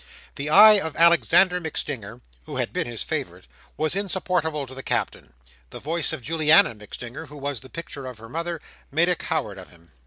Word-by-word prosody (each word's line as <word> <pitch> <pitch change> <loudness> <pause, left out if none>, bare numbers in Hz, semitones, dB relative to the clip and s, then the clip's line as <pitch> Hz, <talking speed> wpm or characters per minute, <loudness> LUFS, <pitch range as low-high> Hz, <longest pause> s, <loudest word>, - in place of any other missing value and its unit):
The 140 +1 -4
eye 210 +5 +9
of 160 -4 -4
Alexander 170 +2 +4
MacStinger, 125 -8 -4 0.3
who - - -7
had - - -2
been - - -2
his - - -4
favourite, - - -4 0.3
was 155 +2 0
insupportable 180 -6 -1
to 130 - -12
the 135 - -7
Captain; 65 - -3 0.4
the - - -9
voice 165 +2 -2
of 125 - -6
Juliana 155 -1 +4
MacStinger, 120 +7 -8
who 145 +1 -12
was 140 -3 -4
the 130 - -15
picture 140 -4 -8
of 125 -3 -8
her 115 +1 -12
mother, 165 +5 -4 0.3
made 165 +5 +2
a 180 - +2
coward 140 - -3
of 95 - -11
him. 85 -2 -20
150 Hz, 190 wpm, -24 LUFS, 125-170 Hz, 0.4 s, eye